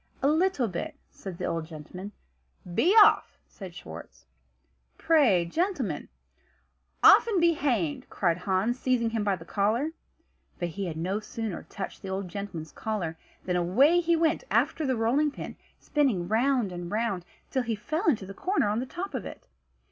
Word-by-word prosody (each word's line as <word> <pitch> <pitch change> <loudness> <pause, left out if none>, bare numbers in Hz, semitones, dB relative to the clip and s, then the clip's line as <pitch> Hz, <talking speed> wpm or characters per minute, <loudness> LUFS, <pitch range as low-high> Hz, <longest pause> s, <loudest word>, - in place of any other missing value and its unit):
"A - - +4
little 315 -4 +2
bit," 175 -4 -5 0.2
said 190 -3 -8
the - - -3
old 165 -1 -2
gentleman. 175 +5 -9 0.6
"Be 320 - +3
off!" - - +3
said 185 -4 -10
Schwartz. 80 - -10 0.7
"Pray, 255 - +4
gentlemen 355 - -2 0.5
" - - -43
"Off, - - +8
and 415 -5 +1
be 340 0 +4
hanged!" 235 - -1
cried 175 -2 0
Hans, 195 +7 0
seizing 245 -3 +1
him 225 -2 -1
by 200 -2 +1
the 165 -2 -12
collar. 220 - 0 0.7
But 175 -1 -2
he 190 +4 -4
had 160 -2 -5
no 185 +5 -1
sooner 220 -3 -5
touched 195 - -6
the 195 - -6
old 190 -1 -3
gentleman's 170 -5 -6
collar, 195 -7 -3 0.3
than 180 - 0
away 245 - +4
he 340 -1 +2
went 325 +5 +1
after 310 -3 +1
the 260 -2 +1
rolling 255 +7 +2
pin, - - -8 0.2
spinning 250 -13 0
round 235 0 +2
and 175 -1 -6
round, 210 -4 -1 0.3
till 260 - +1
he 230 -2 -2
fell 315 - -3
into 215 -10 0
the 195 - -8
corner 365 - 0
on 210 +2 0
the 255 - -3
top 360 +6 -5
of 260 - -3
it. - - -9
215 Hz, 175 wpm, -28 LUFS, 180-280 Hz, 0.7 s, Off